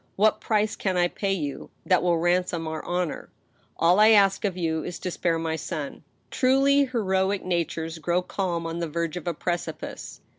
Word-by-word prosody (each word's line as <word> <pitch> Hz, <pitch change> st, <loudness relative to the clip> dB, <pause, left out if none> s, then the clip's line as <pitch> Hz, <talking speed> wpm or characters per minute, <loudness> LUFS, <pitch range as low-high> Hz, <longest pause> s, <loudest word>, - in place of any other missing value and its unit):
What 215 Hz, +2 st, +3 dB
price 215 Hz, -1 st, +1 dB
can 190 Hz, -2 st, -1 dB
I 175 Hz, 0 st, +4 dB
pay 195 Hz, +2 st, -2 dB
you, 150 Hz, -7 st, -4 dB, 0.2 s
that 185 Hz, -2 st, +3 dB
will 175 Hz, -1 st, +2 dB
ransom 175 Hz, -1 st, 0 dB
our 160 Hz, 0 st, -4 dB
honor 175 Hz, -2 st, -2 dB, 0.3 s
.^ -, -, -38 dB
All 175 Hz, +4 st, +4 dB
I 215 Hz, +1 st, +7 dB
ask 200 Hz, -3 st, +5 dB
of 190 Hz, -3 st, -1 dB
you 160 Hz, -3 st, -1 dB
is 180 Hz, -, -5 dB
to 180 Hz, -, -4 dB
spare 170 Hz, -1 st, 0 dB
my 165 Hz, -1 st, -2 dB
son." 155 Hz, -2 st, -5 dB, 0.3 s
Truly 275 Hz, +2 st, +4 dB
heroic 195 Hz, -5 st, 0 dB
natures 165 Hz, -2 st, -2 dB
grow 175 Hz, +3 st, 0 dB
calm 175 Hz, -3 st, -2 dB
on 165 Hz, +1 st, -4 dB
the 170 Hz, -2 st, -2 dB
verge 170 Hz, +1 st, -2 dB
of 180 Hz, -1 st, -6 dB
a 170 Hz, -, -1 dB
precipice. 175 Hz, +2 st, -5 dB
175 Hz, 190 wpm, -25 LUFS, 165-195 Hz, 0.3 s, I